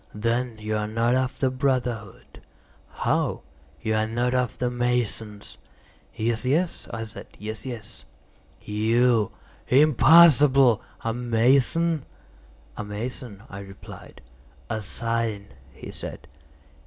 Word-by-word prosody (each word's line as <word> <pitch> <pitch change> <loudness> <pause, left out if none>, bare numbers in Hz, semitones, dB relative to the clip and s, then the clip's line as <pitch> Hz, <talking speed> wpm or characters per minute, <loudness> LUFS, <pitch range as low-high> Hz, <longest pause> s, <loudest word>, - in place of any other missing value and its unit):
"Then 115 +2 -1
you 110 0 -3
are 105 0 -2
not 115 +2 +1
of 130 0 0
the 130 -2 +1
brotherhood." 125 -6 -2 0.5
"How?" - - -1 0.4
"You 110 - 0
are 110 0 +1
not 120 +2 0
of 125 -1 0
the 125 -1 -1
masons." 115 -4 -2 0.6
"Yes, 115 +1 -1
yes," 160 +7 0
I 115 - -4
said, 110 0 -9
"yes, 110 +4 -6
yes." 120 -5 -7 0.6
"You? 115 +1 +2 0.4
Impossible! 140 -3 +6 0.2
A 115 - -1
mason?" 130 +7 +2 0.7
"A - - -5
mason," 105 0 -6
I 100 - -8
replied. 95 0 -12 0.5
"A 110 -1 -2
sign," 110 0 -2 0.2
he - - -10
said. - - -5
115 Hz, 115 wpm, -25 LUFS, 110-130 Hz, 0.7 s, Impossible